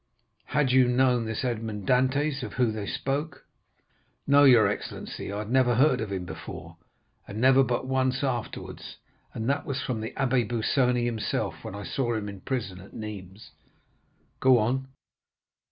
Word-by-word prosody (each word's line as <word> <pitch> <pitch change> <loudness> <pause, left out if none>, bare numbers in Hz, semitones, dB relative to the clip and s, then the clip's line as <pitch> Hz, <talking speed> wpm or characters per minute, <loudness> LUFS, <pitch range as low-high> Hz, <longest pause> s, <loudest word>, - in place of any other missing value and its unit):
Had 140 -2 +1
you 130 -1 +5
known 125 -1 +2
this 110 +3 -3
Edmond 110 -4 -3
Dantès, 140 +3 +2
of - - -6
whom 125 -3 +1
they 105 -2 -5
spoke?" 140 0 -3 0.8
"No, 140 +1 +6
your 120 -6 +7
excellency, 100 -1 -5
I 100 - -4
had 105 +2 -5
never 130 -2 +4
heard 130 0 +3
of 110 -2 -4
him 95 -2 -3
before, 80 -2 -9 0.5
and 100 - -6
never 130 +2 +6
but 125 0 -1
once 130 0 0
afterwards, 120 -5 -4 0.4
and 110 0 -3
that 140 +1 +1
was 140 0 -3
from 115 -4 -3
the 110 - -3
Abbé 125 -4 +1
Busoni 125 +1 +1
himself, 115 -3 -2
when 95 - -6
I 100 - -6
saw 120 -1 -1
him 105 -1 -3
in 100 - -7
the - - -16
prison 110 -8 -3
at 95 - -14
Nîmes." 105 -2 -8 0.9
"Go 130 -1 +6
on." 125 +4 0
125 Hz, 170 wpm, -27 LUFS, 110-130 Hz, 0.9 s, your